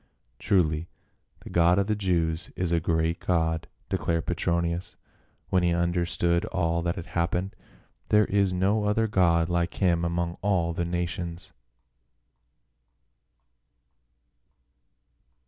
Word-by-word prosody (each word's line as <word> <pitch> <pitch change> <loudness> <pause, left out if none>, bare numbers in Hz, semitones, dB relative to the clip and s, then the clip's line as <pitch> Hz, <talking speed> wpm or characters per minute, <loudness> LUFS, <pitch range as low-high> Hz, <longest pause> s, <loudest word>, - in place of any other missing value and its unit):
"Truly 80 -4 +1 0.5
the - - -10
God 85 +1 +4
of 100 - +2
the 105 +1 0
Jews 85 -4 -1
is 90 -2 -2
a 85 - +3
great 80 +1 0
god," 80 -2 0 0.2
de - - -1
clared 85 -1 -1
Petronius, 85 +1 -1 0.5
when 95 - +3
he 85 -1 +2
understood 85 0 +1
all 85 -4 0
that 85 0 -1
had 85 - -6
happened. 90 +3 -2 0.3
" - - -39
There 105 0 +5
is 100 -1 +1
no 100 +4 +1
other 105 +2 +2
god 85 -5 +3
like 85 0 -1
him 85 -3 +2
among 85 0 -2
all 90 -4 +1
the 85 +1 -2
nations 85 +1 -4
85 Hz, 125 wpm, -27 LUFS, 85-95 Hz, 0.5 s, There